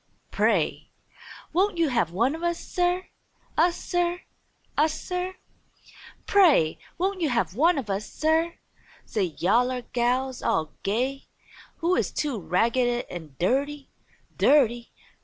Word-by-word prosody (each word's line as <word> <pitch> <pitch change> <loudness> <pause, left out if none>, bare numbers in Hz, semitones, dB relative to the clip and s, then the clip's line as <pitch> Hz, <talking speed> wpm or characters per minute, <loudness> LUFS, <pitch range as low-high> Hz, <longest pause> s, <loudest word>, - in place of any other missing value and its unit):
"Pray! - - +1 0.6
Won't 375 +2 +2
you 330 -3 +2
have 235 -10 +1
one 235 - +1
o' 325 - -8
us, 345 0 0
Sir? 360 0 -1 0.5
Us, 345 +2 +2
Sir? 350 0 -1 0.5
Us, 310 +1 +1
Sir? 365 +1 -3 0.9
Pray! 310 - +4 0.2
Won't 375 +1 -1
you 315 - +2
have 235 -6 0
one 325 - +3
o' 275 - -1
us, 200 +2 -5
Sir?" 320 +2 +1 0.5
say 185 -7 -2
yaller 245 +6 +2
gals 250 +2 -1
all 155 -1 0
gay. 255 +7 -1 0.6
"You 345 +2 +3
is - - +1
too 280 -7 -2
ragged 235 +8 +1
an' 160 -6 -8
dirty! 275 +8 -1 0.4
Dirty! 240 -5 +3
270 Hz, 125 wpm, -26 LUFS, 235-340 Hz, 0.9 s, Pray